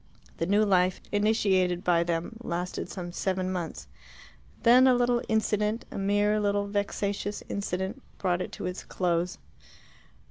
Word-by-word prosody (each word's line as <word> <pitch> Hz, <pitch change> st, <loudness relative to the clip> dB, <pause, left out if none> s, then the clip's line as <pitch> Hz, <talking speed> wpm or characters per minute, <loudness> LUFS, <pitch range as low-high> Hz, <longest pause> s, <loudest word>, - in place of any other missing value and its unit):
The 165 Hz, -, -1 dB
New 205 Hz, +3 st, +4 dB
Life 185 Hz, -2 st, +3 dB
initiated 195 Hz, -4 st, +2 dB
by 170 Hz, -1 st, +3 dB
them 170 Hz, +5 st, -2 dB
lasted 180 Hz, -4 st, -3 dB
some 175 Hz, -2 st, -6 dB
seven 185 Hz, +1 st, -1 dB
months. 175 Hz, -3 st, -4 dB, 0.8 s
Then 250 Hz, +2 st, +7 dB
a 255 Hz, -, +6 dB
little 245 Hz, 0 st, +2 dB
incident 215 Hz, 0 st, +1 dB
a -, -, -5 dB
mere 205 Hz, +2 st, +2 dB
little 205 Hz, -1 st, +1 dB
vexatious 205 Hz, 0 st, -2 dB
incident 200 Hz, +4 st, -3 dB, 0.2 s
brought 180 Hz, -2 st, 0 dB
it -, -, -4 dB
to -, -, -6 dB
its 180 Hz, +1 st, -4 dB
close. 175 Hz, 0 st, -1 dB
200 Hz, 140 wpm, -28 LUFS, 180-210 Hz, 0.8 s, Then